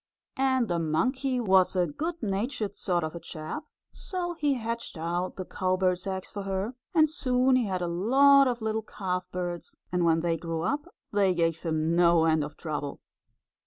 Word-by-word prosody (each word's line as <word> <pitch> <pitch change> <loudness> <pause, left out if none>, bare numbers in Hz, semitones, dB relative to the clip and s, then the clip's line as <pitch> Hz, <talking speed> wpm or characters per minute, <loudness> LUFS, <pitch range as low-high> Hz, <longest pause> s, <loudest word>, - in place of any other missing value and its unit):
And 260 -3 +2
the 175 -3 0
monkey 255 - 0
was 190 -5 +4
a 180 -1 +3
good 320 - -4
natured 210 +1 -2
sort 175 -3 0
of 155 - -3
a 170 - -6
chap, 155 - -6 0.3
so 355 -2 -4
he 295 -4 +1
hatched 230 -4 -4
out 175 +3 -2
the 185 - -5
cowbird's 185 0 0
eggs 190 -1 -4
for 205 - -5
her, 195 +4 -2 0.2
and 315 -1 +6
soon 255 -3 +2
he 250 -2 +2
had 185 -2 -2
a - - -1
lot 270 +10 +5
of 240 -2 -2
little 220 0 0
calfbirds, 180 -4 -4 0.2
and 180 -1 +1
when 165 -1 +3
they 165 -1 0
grew 165 -1 -3
up 290 - -1 0.3
they 195 -3 +3
gave 165 -1 +1
him 160 0 0
no 170 -1 +5
end 160 -2 +3
of 150 0 -8
trouble. 150 -3 -4
190 Hz, 180 wpm, -28 LUFS, 170-250 Hz, 0.3 s, and